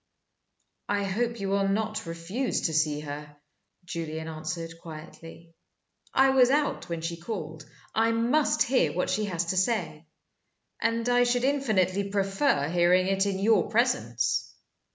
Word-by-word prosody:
"I 205 0 +1
hope 230 +4 -1
you 195 -1 -2
will 195 0 +1
not 215 -1 -1
refuse 170 +10 -2
to 160 - -1
see 150 -1 +1
her," 150 0 -8 0.5
Julian 160 -2 -5
answered, 160 +1 -5
quietly. 165 +1 -11 0.6
"I 270 0 +4
was 255 -2 +5
out 290 -8 0
when 170 -1 -3
she 165 +1 -3
called. 160 -7 -6 0.2
I 225 +1 +2
must 240 +7 +2
hear 205 - +2
what 180 +1 -1
she 210 +3 0
has 175 -3 -2
to 185 - -3
say 185 -6 -1 0.7
and 230 +1 0
I 245 0 +4
should 245 0 +1
infinitely 200 -9 +1
prefer 195 - +1
hearing 175 +2 +3
it 195 +1 +1
in 195 -1 -1
your 205 -2 +3
presence. 120 - 0
190 Hz, 145 wpm, -27 LUFS, 165-230 Hz, 0.7 s, was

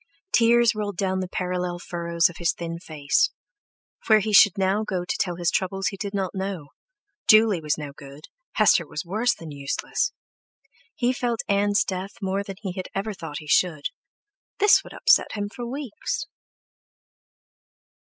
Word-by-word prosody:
Tears 235 0 +5
rolled 205 -3 -4
down 190 0 0
the 185 - -3
parallel 180 -1 -2
furrows 170 -1 0
of 175 - -10
his 170 -1 +1
thin 170 -1 -6
face; 155 -5 +1 0.8
where 220 - +7
he 215 0 -1
should 205 -2 +7
go - - -6
now 200 +3 +1
to 180 -4 -2
tell 175 -2 0
his 175 0 0
troubles 190 0 0
he 195 - -7
did 200 0 -4
not 195 -3 -2
know; 190 -6 -4 0.6
Juley 215 -5 +6
was 150 -1 0
no 150 -2 -6
good, 140 0 -12 0.3
Hester - - +4 0.2
worse 225 +7 +1
than 165 -2 -10
useless! 140 - -2 0.8
He 245 +1 +1
felt 240 -2 -1
Ann's 205 0 +2
death 190 +1 -5
more 195 0 -1
than 195 -1 -7
he 190 - -2
had 185 0 -6
ever 205 +2 -2
thought 160 -5 -7
he 150 - -9
should; 155 -2 +2 0.7
this 415 0 +5
would - - -12
upset 485 -1 +3
him 205 -1 -3
for 240 -1 -6
weeks! 280 +2 -4
190 Hz, 160 wpm, -24 LUFS, 170-215 Hz, 0.8 s, where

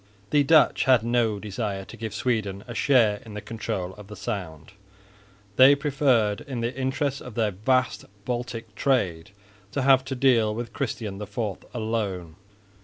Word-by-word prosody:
The 145 - +5
Dutch 155 +2 +4
had 130 -4 +5
no 115 -2 +1
desire 100 -2 -4
to - - -11
give 110 0 -5
Sweden 105 -6 -1
a 120 - -6
share 115 -6 +3
in 110 -2 -10
the - - -3
control 100 -5 -4
of 105 - -11
the 105 - -9
Sound; 90 -6 -6 0.9
they 135 +2 +8
preferred 135 -7 +1
in 135 -5 -5
the 120 +2 -2
interests 135 +1 -1
of 125 -4 -10
their 110 -3 +1
vast 130 +6 0 0.2
Baltic 120 -3 -4
trade 95 -10 0 0.4
to 135 - -1
have 135 -1 +5
to 135 0 -4
deal 120 -5 +3
with 120 0 -5
Christian 110 -6 -4
IV 105 +2 -7 0.3
alone. 105 -8 -3
115 Hz, 160 wpm, -25 LUFS, 105-130 Hz, 0.9 s, they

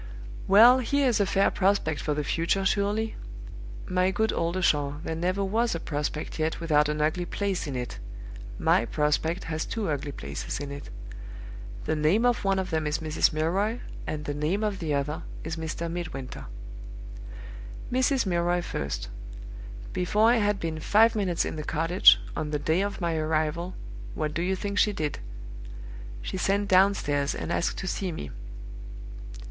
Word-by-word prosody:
"Well, 230 +6 +8
here 280 +2 +1
is 235 -3 +2
a 200 - +2
fair 195 +1 +3
prospect 190 -6 +1
for 150 - -1
the 150 - -1
future 170 +6 0
surely? 210 +3 0 0.7
My 180 0 +1
good 220 +3 0
Oldershaw, 165 -5 +1
there 160 - -3
never 180 +4 0
was 225 +2 +1
a - - -3
prospect 150 +1 -4
yet 155 +1 0
without 150 -3 +2
an 150 0 -1
ugly 160 +4 0
place 195 -4 -2
in 140 - -4
it. 125 -1 -4 0.6
My 115 - +3
prospect 150 +7 0
has 160 -1 -3
two 210 -7 -2
ugly 145 0 -3
places 70 - -5
in 145 -1 -5
it. 140 0 -8 1.0
The - - 0
name 160 +10 +2
of 245 -1 +2
one 195 -1 +2
of 190 -1 -2
them 160 -1 0
is 150 +2 0
Mrs. 155 -1 +1
Milroy, 190 +9 0 0.3
and 150 -1 -4
the 145 - -2
name 155 +8 -1
of 210 -2 -1
the 160 -3 -3
other 145 +2 -2 0.2
is 160 0 -4
Mr. 160 +1 -4
Midwinter. 160 -7 -6 1.5
"Mrs. 260 0 +2
Milroy 175 -1 +1
first. 70 - -4 0.9
Before 210 +5 +3
I 245 - +4
had 205 -2 +1
been 160 -1 -3
five 220 +8 +4
minutes 190 -5 0
in - - -4
the 155 - -4
cottage, 165 - +5 0.2
on 150 - -2
the 150 - 0
day 160 +5 +1
of 200 -1 -3
my 170 -1 0
arrival, 160 +3 -1 0.4
what 155 -1 -2
do 170 - -1
you 190 +2 0
think 200 +2 -2
she 210 - +3
did? 150 -5 -3 1.0
She - - -4
sent 200 +2 +1
downstairs 185 -7 +3
and - - -4
asked - - 0
to - - -4
see 185 0 -2
me. 75 - -6
170 Hz, 170 wpm, -27 LUFS, 150-200 Hz, 1.5 s, Well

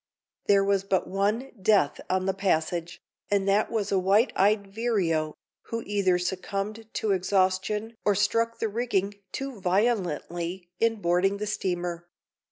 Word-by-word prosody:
There 200 -1 +5
was 195 -1 +2
but 195 -1 +1
one 210 +7 0
death 190 -7 +3
on 185 0 +1
the 190 - +1
passage, 175 -3 -1 0.3
and 200 -1 +1
that 200 +2 +3
was 210 -3 -1
a 195 - +3
white 200 +6 +3
eyed 200 +1 +3
vireo, 180 -9 0 0.3
who 230 0 -3
either 200 -3 +2
succumbed 200 +4 -4
to 215 -2 0
exhaustion 190 +3 +1
or 205 - +3
struck 230 +3 +1
the 225 - -1
rigging 205 -3 -1 0.2
too 270 -6 -5
violently 180 -3 -1
in 230 0 +3
boarding 180 +3 +2
the 210 - -3
steamer. 175 -4 -3
195 Hz, 145 wpm, -27 LUFS, 185-215 Hz, 0.3 s, There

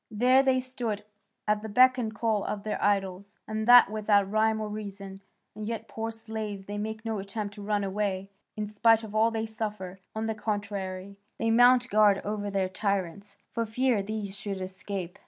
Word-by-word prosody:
There 250 +5 +4
they 265 -1 +3
stood 245 -5 -3 0.4
at 210 0 +2
the 220 - -6
beck 255 +4 +5
and 225 -3 -2
call 215 -1 0
of 205 -1 -4
their 215 - -3
idols, 200 0 -1
and 215 0 -3
that 245 -3 +8
without 205 -2 +2
rhyme 220 0 +2
or 215 - -3
reason; 200 -2 -7 0.3
and 210 0 -6
yet, 225 -1 -4
poor 225 0 -4
slaves, 220 -3 -6
they 205 +1 -5
make 220 +1 -5
no 220 -2 -2
attempt 200 +1 -5
to 205 - -10
run 205 0 0
away, 195 -1 -2 0.3
in 210 - -1
spite 225 +2 +3
of 215 -1 -8
all 220 +1 +4
they 225 -1 -2
suffer; 210 -4 -5 0.2
on 220 0 -2
the 220 - -1
contrary, 200 -2 -4 0.2
they 225 0 0
mount 245 +2 +6
guard 205 -2 +5
over 205 0 -2
their 195 -1 0
tyrants, 200 +1 -3
for 230 - -1
fear 230 0 +1
these 205 -1 -5
should 200 -1 -5
escape." 185 -1 -6
210 Hz, 190 wpm, -28 LUFS, 200-220 Hz, 0.4 s, that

